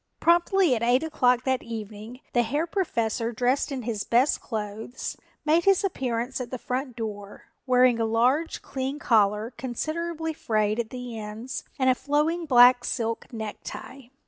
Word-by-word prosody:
Promptly 345 -1 +4
at 225 - -3
eight 245 +4 +3
o'clock 250 -6 +2
that 260 -1 0
evening 220 +2 -8
the 240 - +4
Herr 290 +8 0
Professor, 235 - -1
dressed 250 +5 0
in 260 -3 -4
his 220 -3 -2
best 250 +5 +2
clothes, 220 +2 -5 0.3
made 320 +3 +3
his 390 0 +4
appearance 255 -8 -2
at 245 - -5
the 255 - -4
front 255 +1 -4
door, 205 -3 -7 0.2
wearing 250 -2 +4
a 225 - +2
large 250 +8 +1
clean 270 +1 -3
collar 215 -3 +2
considerably 320 +5 -3
frayed 215 -5 0
at 230 -2 -2
the 250 -3 -6
ends 220 +5 -6
and 260 - +1
a 255 - +6
flowing 305 +5 0
black 245 -2 +7
silk 230 -2 -3
necktie. 230 +3 -7
250 Hz, 155 wpm, -26 LUFS, 225-285 Hz, 0.3 s, black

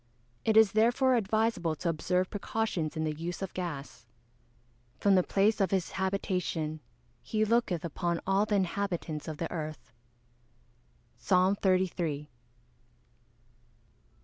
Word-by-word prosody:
It 220 -1 +3
is 220 -3 +7
therefore 240 +5 +3
advisable 215 -6 +1
to 175 - -4
observe 180 +3 0
precautions 205 -6 -2
in 160 - 0
the 155 -1 -1
use 170 +5 -5
of 190 - -5
gas. 145 -8 -5
[Verse: 120 - -25 0.9
"From 200 - +4
the 185 - +6
place 205 +4 +2
of 195 - +3
his 190 -3 -1
habitation 180 -5 -2 0.4
he 215 0 0
looketh 215 -7 +1
upon 170 +1 -1
all 195 +2 +2
the 210 - +1
inhabitants 180 -5 -2
of 155 -2 -5
the 165 - -4
earth." 155 -5 -6 1.3
PSALM 185 +8 +3
XXXIII. 175 -6 0
185 Hz, 125 wpm, -30 LUFS, 160-205 Hz, 1.3 s, is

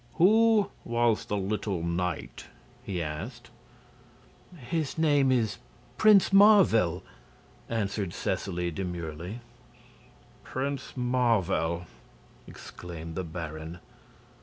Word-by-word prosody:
"Who 215 +4 +4
was 120 -1 +1
the 105 - -2
little 100 -2 -2
knight?" 85 +1 -3 0.3
he 90 -4 -3
asked. 115 - -7 1.1
"His 155 +3 -3
name 145 -4 +3
is 115 -5 0 0.4
Prince 210 -3 +5
Marvel," 185 - +5 0.7
answered 100 -4 -2
Seseley, 90 -1 -2
demurely. 90 +3 -5 1.0
"Prince 135 0 -4
Marvel?" 115 -9 +1 0.6
exclaimed 85 -2 -9
the 95 - -3
Baron. 80 0 -7
105 Hz, 85 wpm, -28 LUFS, 85-130 Hz, 1.1 s, Prince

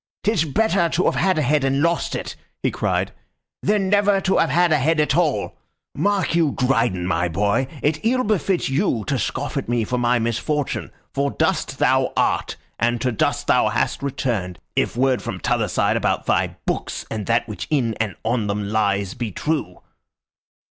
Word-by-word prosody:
"'Tis 195 -6 +2
better 180 +2 +2
to 175 +3 +1
have - - +3
had 190 -1 +1
a 155 - +2
head 145 +2 +2
and 135 +2 +1
lost 170 +1 0
it," - - -5 0.3
he - - +2
cried, - - -1 0.5
"than 205 -2 +1
never 205 0 +3
to 190 0 +1
have 165 - +3
had 175 +4 +3
a 155 - +4
head 160 +4 +2
at 150 -2 +2
all! 165 -4 0 0.4
Mark 200 -3 0
you, 165 -4 +2
Dryden, 120 -8 +1
my 90 -1 +1
boy, 100 +9 +1 0.2
it 150 +1 0
ill 255 +3 +2
befits 195 - 0
you 135 - 0
to 135 -3 -1
scoff 140 +6 -3
at 135 - -3
me 120 -1 +1
for 125 +3 -2
my 120 0 +2
misfortune, 120 +6 -1 0.2
for 140 +1 0
dust - - -1
thou - - +2
art, - - +1 0.2
and 120 +1 +1
to 130 - 0
dust 110 - 0
thou - - +3
hast - - -1
returned, 115 - -2 0.2
if - - 0
word 130 0 +2
from - - -5
t'other - - 0
side - - +1
about - - 0
thy - - +1
books - - -3
and 110 -2 -4
that 115 +1 +2
which 105 - -6
in 125 -7 +1
and 105 -3 -1
on 115 -2 0
them 100 0 -2
lies 100 -3 0
be 120 -4 -4
true." 145 - -3
135 Hz, 190 wpm, -22 LUFS, 115-165 Hz, 0.5 s, a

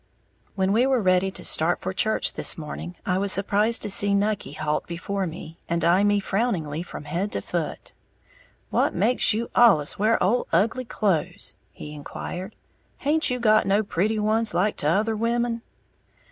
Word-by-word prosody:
_ - - -42 0.5
When 190 0 +1
we 240 +4 +3
were 265 -2 +2
ready 185 -2 +2
to - - -7
start 160 +2 +1
for 185 - -4
church 220 +3 0
this - - -1
morning, 165 +3 -7
I 185 0 0
was 200 0 +1
surprised 205 +4 +2
to - - -2
see 200 +1 +3
Nucky 200 -8 -1
halt 150 0 -2
before 185 +3 -3
me, 165 0 -9
and 170 0 0
eye 180 +4 +4
me 205 0 +3
frowningly 190 -8 -1
from 175 - -8
head 175 +7 -3
to - - -2
foot. - - -4 0.8
"What - - +1
makes 250 - +3
you 230 +2 -2
allus 195 -12 +4
wear 220 +2 +3
ole 220 +7 +1
ugly 225 +9 +1
clothes?" 180 -4 -2 0.2
he 150 - -9
inquired. 175 +6 -7 0.4
"Haint 310 +3 +1
you 250 0 -1
got 215 -2 +3
no 200 +2 +2
pretty 205 +3 -1
ones, 215 -1 +1
like 200 +4 +1
t'other 205 +9 +1
women?" 235 +1 -1
200 Hz, 175 wpm, -24 LUFS, 175-220 Hz, 0.8 s, eye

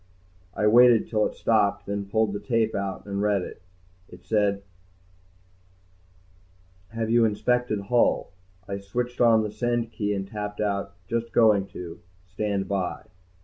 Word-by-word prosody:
I 105 - 0
waited 120 +1 +6
till 105 -2 +2
it - - -10
stopped, 100 -3 +1
then 100 0 -4
pulled 110 +1 +2
out - - -5
the 100 - -3
tape 115 -2 0
and 100 0 -3
read 100 -2 +1
it. - - -9 0.5
It 90 0 -15
said, 100 -1 +1 2.3
HAVE 115 0 -3
YOU 120 0 +5
INSPECTED 115 0 0
HULL? 120 -1 +1 0.4
I 100 0 -4
switched 120 +6 -4
on 115 -2 +5
the 105 - -4
send 120 +1 -1
key 105 -2 -2
and 95 0 -4
tapped 105 -1 -6
out, 100 -2 -2
JUST 115 +2 -2
GOING 105 -4 +4
TO. 85 -3 -9 0.3
STAND 100 +1 -2
BY. 95 -4 -3
105 Hz, 145 wpm, -25 LUFS, 100-115 Hz, 2.3 s, waited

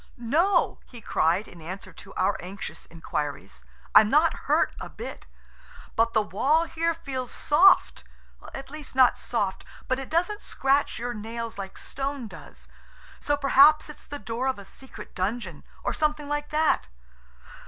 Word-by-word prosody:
"No," 310 - +2
he 240 - -11
cried, 175 -1 +1
in 170 - -13
answer 185 +2 -8
to 195 - -12
our 190 +2 +2
anxious 190 +2 -8
inquiries. 145 - -5 0.3
"I'm - - +8
not - - +4 0.2
hurt - - +3
a - - -6
bit, - - -8 0.7
but 230 +1 +2
the 215 - +3
wall 275 - +2
here 335 0 -1
feels 260 -6 -5
soft–at 295 -4 +1
least 305 -3 -9
not 255 -2 +5
soft–but 225 +4 -3
it 270 - -7
doesn't 355 +6 0
scratch 275 +1 +1
your 240 +1 -3
nails 225 0 -6
like 195 -1 -7
stone 275 -3 -4
does, 185 - -13 0.5
so 290 0 0
perhaps 285 +2 +6
it's 300 - -12
the 290 - -5
door 230 +3 -3
of 265 - 0
a 200 - -10
secret 265 +6 -11
dungeon 185 -4 -3 0.2
or - - -1
something 300 -1 0
like 295 0 -2
that." 305 - +2
250 Hz, 150 wpm, -26 LUFS, 200-295 Hz, 0.7 s, I'm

